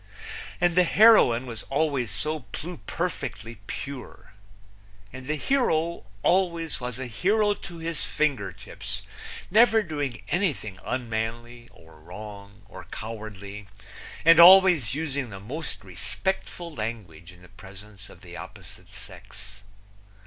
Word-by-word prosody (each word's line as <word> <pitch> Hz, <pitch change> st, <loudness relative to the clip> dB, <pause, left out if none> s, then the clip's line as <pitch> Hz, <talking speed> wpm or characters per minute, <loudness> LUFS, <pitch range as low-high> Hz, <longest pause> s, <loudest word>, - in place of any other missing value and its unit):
And 175 Hz, -1 st, +3 dB
the 180 Hz, -, +6 dB
heroine 175 Hz, -, +6 dB
was 115 Hz, -3 st, -7 dB
always 140 Hz, -4 st, 0 dB
so 155 Hz, +10 st, -1 dB
pluperfectly 160 Hz, -, -5 dB
pure. 135 Hz, -6 st, -8 dB, 0.8 s
And 130 Hz, 0 st, -9 dB
the 155 Hz, -, 0 dB
hero 170 Hz, -, 0 dB, 0.2 s
always 170 Hz, -3 st, +1 dB
was 125 Hz, -1 st, -4 dB
a 130 Hz, -, -4 dB
hero 205 Hz, -, +2 dB
to 175 Hz, -4 st, -10 dB
his 165 Hz, -1 st, -2 dB
finger 135 Hz, -11 st, 0 dB
tips, 100 Hz, +1 st, -7 dB, 0.5 s
never 220 Hz, +1 st, +5 dB
doing 145 Hz, -, -4 dB
anything 145 Hz, -, -1 dB
unmanly 120 Hz, 0 st, -4 dB
or 80 Hz, -1 st, -18 dB
wrong 100 Hz, +3 st, -11 dB
or -, -, -11 dB
cowardly, 105 Hz, -2 st, -8 dB, 0.6 s
and 165 Hz, 0 st, +8 dB
always 175 Hz, -, +8 dB
using 140 Hz, -5 st, -2 dB
the 100 Hz, -2 st, -8 dB
most 130 Hz, +6 st, -6 dB
respectful 130 Hz, -, -3 dB
language 105 Hz, -, -6 dB
in 90 Hz, 0 st, -18 dB
the 90 Hz, -, -16 dB
presence 100 Hz, 0 st, -13 dB
of -, -, -15 dB
the 90 Hz, -3 st, -11 dB
opposite 80 Hz, -, -11 dB
sex. 100 Hz, -, -11 dB
125 Hz, 120 wpm, -26 LUFS, 105-165 Hz, 0.8 s, and